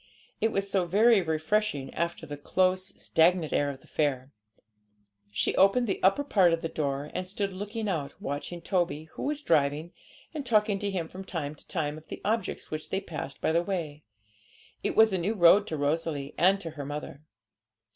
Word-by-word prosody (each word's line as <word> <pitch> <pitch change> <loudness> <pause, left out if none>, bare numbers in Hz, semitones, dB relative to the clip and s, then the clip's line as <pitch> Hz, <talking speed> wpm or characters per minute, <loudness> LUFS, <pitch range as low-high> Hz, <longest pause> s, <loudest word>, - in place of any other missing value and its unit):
It 225 - +2
was 195 0 -1
so 190 -3 +1
very 215 +4 +5
refreshing 160 -2 -1
after 170 0 -2
the 145 -1 -6
close, 185 +5 +1
stagnant 165 0 +2
air 145 - +2
of 135 -1 -7
the - - -20
fair. 140 -3 -1 1.0
She - - 0
opened 200 +6 +4
the 195 - -2
upper 195 +10 +4
part 190 -11 +4
of 165 - -1
the 165 - -1
door, 145 -2 -2
and 185 - -3
stood 195 0 -2
looking 210 +3 -4
out, 155 -8 -3
watching 145 +5 -5
Toby, 165 -5 -1
who - - -9
was 295 +1 -2
driving, 155 - +1 0.4
and 300 -3 -4
talking 210 -5 +2
to 205 - -1
him 180 -4 -2
from 185 +3 -9
time 160 -6 -4
to 155 - -15
time 155 -3 -2
of 155 - -23
the - - -7
objects 225 +2 -2
which 155 0 -5
they 190 - 0
passed 155 -7 -7
by - - +2
the 170 +1 +3
way; 165 -6 -4 0.8
it - - -1
was 220 -2 +6
a 185 - +1
new 200 +6 -1
road 200 +3 +6
to 155 - -3
Rosalie 145 -1 -1
and 190 +3 +4
to 165 - -6
her 150 -2 -7
mother. 145 0 -6
170 Hz, 195 wpm, -28 LUFS, 150-195 Hz, 1.0 s, was